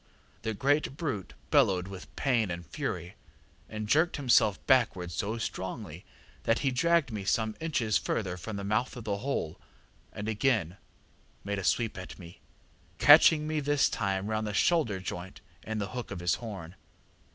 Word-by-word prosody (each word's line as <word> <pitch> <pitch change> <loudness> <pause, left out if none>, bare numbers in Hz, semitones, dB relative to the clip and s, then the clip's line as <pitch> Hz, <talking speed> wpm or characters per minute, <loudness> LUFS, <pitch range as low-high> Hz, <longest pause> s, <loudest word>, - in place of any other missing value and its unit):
The 110 -1 -3
great 140 +4 +1
brute 140 - -4 0.2
bellowed 90 -1 +3
with 95 -1 -10
pain 120 -7 +1
and 85 0 -5
fury, 85 +4 -4 0.6
and 110 -1 -5
jerked 160 +9 +3
himself 120 -7 +4
backwards 105 - +2
so 105 +8 -2
strongly, 95 -4 -5 0.4
that 115 - +3
he 135 - +3
dragged 165 +2 +2
me 105 -3 -4
some 110 +2 0
inches 125 -10 +1
further 95 -5 -2
from 100 +4 -6
the 100 - -4
mouth 110 +6 -1
of 120 - -7
the 105 -2 -1
hole, 110 - -3 0.5
and 105 - -6
again 105 -5 +1 0.7
made 100 0 -2
a - - -5
sweep 110 +2 0
at 90 - -9
me, 85 -1 -13 0.6
catching 150 +1 +7
me 155 0 0
this 145 0 +2
time 95 0 -1
round 110 0 -1
the 105 - -3
shoulder 140 - +2
joint 90 0 -6 0.2
in 110 0 -4
the 100 -1 -2
hook 125 -1 -5
of - - -5
his 90 0 +1
horn. 95 -7 -7
110 Hz, 165 wpm, -29 LUFS, 95-130 Hz, 0.7 s, catching